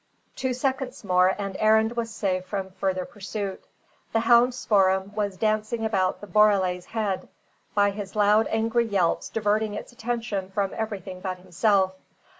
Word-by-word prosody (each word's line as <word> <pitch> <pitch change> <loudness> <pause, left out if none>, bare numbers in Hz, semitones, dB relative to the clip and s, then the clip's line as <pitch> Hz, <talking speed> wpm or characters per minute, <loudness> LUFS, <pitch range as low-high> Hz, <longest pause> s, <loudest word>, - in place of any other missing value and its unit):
Two 260 -1 -1
seconds 260 0 -2
more 185 -1 +3
and 195 -2 -4
Arend 220 +2 +3
was 230 -1 -2
safe 190 -4 -1
from 190 0 -4
further 185 -1 -2
pursuit. 200 -1 -6 0.5
The 225 - +3
hound 240 +2 +5
Spoor'em 195 -4 +2
was 205 -3 -2
dancing 215 +2 0
about 190 -4 0
the - - -7
borele's 190 -3 +3
head, 210 -4 -2 0.5
by 205 -1 +4
his 200 -1 -7
loud, 210 +1 +4
angry 225 +1 +1
yelps 190 -5 0
diverting 210 0 0
its 210 - -7
attention 230 -5 -3
from 195 0 -1
everything 195 -4 -5
but 185 -1 -3
himself. 190 +1 +1
205 Hz, 150 wpm, -25 LUFS, 190-225 Hz, 0.5 s, hound